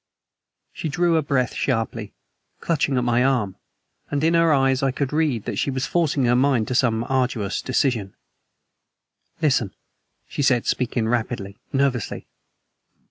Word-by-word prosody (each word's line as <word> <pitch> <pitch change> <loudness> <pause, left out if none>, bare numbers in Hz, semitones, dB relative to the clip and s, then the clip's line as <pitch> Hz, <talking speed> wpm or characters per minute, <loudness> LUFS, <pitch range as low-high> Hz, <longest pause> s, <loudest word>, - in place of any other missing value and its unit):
She 160 - -4
drew 170 +4 +1
her 160 - +3
breath 140 -4 0
sharply, 115 -4 -2 0.5
clutching 145 -5 0
at 125 - +1
my 120 0 +2
arm, 120 -8 +1 0.5
and 145 0 -1
in 165 +1 +3
her 165 -1 +4
eyes 135 -2 +3
I 135 - +2
could 140 +1 -2
read 150 -8 0
that - - -3
she - - 0
was 130 0 -1
forcing 155 -6 +1
her 120 0 +3
mind 125 -3 +2
to - - -1
some 120 -3 +2
arduous 125 -6 0
decision. 120 -6 0 1.3
"Listen." 130 -9 +1 0.5
She - - -4
was 130 -4 +2
speaking 120 -3 0
rapidly, 110 -4 -2
nervously. 135 -5 -1
130 Hz, 145 wpm, -23 LUFS, 120-140 Hz, 1.3 s, her